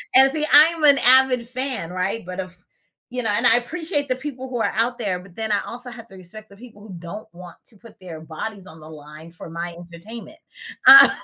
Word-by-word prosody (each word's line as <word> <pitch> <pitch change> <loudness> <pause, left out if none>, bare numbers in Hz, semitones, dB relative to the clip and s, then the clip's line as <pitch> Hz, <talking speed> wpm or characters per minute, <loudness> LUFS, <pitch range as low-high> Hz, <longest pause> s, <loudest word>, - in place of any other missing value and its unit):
And 265 +1 +6
see, 305 +1 -1
I'm 315 +3 +6
an 285 -2 +6
avid 255 -1 +4
fan, 255 -8 -4
right? 185 +3 -3
But 180 +1 -8
of 185 -1 -7 0.6
you 250 0 -3
know? - - -1
And 205 - 0
I 230 - +5
appreciate 295 +3 -3
the 255 - 0
people 260 -1 -8
who 245 -2 -4
are - - -1
out 235 +2 -1
there, 195 -6 -3
but 180 -1 -17
then 220 -1 -4
I 205 - +2
also 245 +1 -6
have 230 -1 -12
to 195 - -16
respect 190 +4 -12
the 200 - -16
people 225 -2 -15
who 205 -2 -12
don't 175 +5 -9
want 175 -1 -12
to 220 - -18
put 230 +2 -18
their 175 -4 -10
bodies 185 +6 -8
on 160 -2 -14
the 155 0 -13
line 155 +1 -13
for 165 0 -12
my 170 +1 -6
entertainment. 175 +7 -11 0.5
Uh 275 +1 +11
220 Hz, 230 wpm, -21 LUFS, 180-255 Hz, 0.6 s, Uh